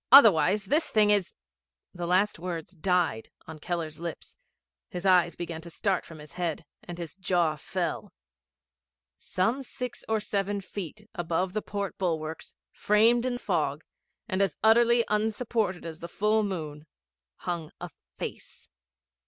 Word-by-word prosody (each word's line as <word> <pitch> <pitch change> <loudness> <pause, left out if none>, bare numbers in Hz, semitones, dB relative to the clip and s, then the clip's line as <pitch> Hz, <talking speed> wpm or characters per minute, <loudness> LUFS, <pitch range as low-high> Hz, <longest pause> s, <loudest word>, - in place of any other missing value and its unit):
Otherwise 205 - +8
this 305 - +2
thing 210 -2 +5
is 200 -3 +2 0.3
' - - -64
The 175 -2 -4
last 185 +1 +2
words 170 -1 -5
died 175 - +1 0.2
on 160 -1 -9
Keller's 165 -2 -3
lips, 170 -1 -7 0.5
his 180 +2 -5
eyes 180 -2 +5
began 170 -2 -5
to 170 - -9
start 190 +2 0
from 165 - -10
his 150 -1 -11
head, 170 -3 -2 0.2
and 175 -1 -7
his 170 -2 -6
jaw 175 -4 +1
fell. 150 - -3 1.1
Some 225 +9 0
six 250 -1 -6
or 220 0 +2
seven 200 -1 -1
feet 200 +2 -7
above 175 +2 -1
the 215 - -1
port 200 -2 -4
bulwarks, 160 -3 -3 0.2
framed 230 +4 +4
in 245 -1 -1
fog, 160 - -1 0.4
and 185 +1 0
as 195 - +1
utterly 235 +1 +5
unsupported 210 -3 0
as 160 -1 -6
the 170 - -6
full 210 +4 +2
moon, 160 -7 -4 0.5
hung 170 -3 -4
a 175 -1 -7 0.3
Face. - - -7
185 Hz, 145 wpm, -28 LUFS, 165-210 Hz, 1.1 s, Otherwise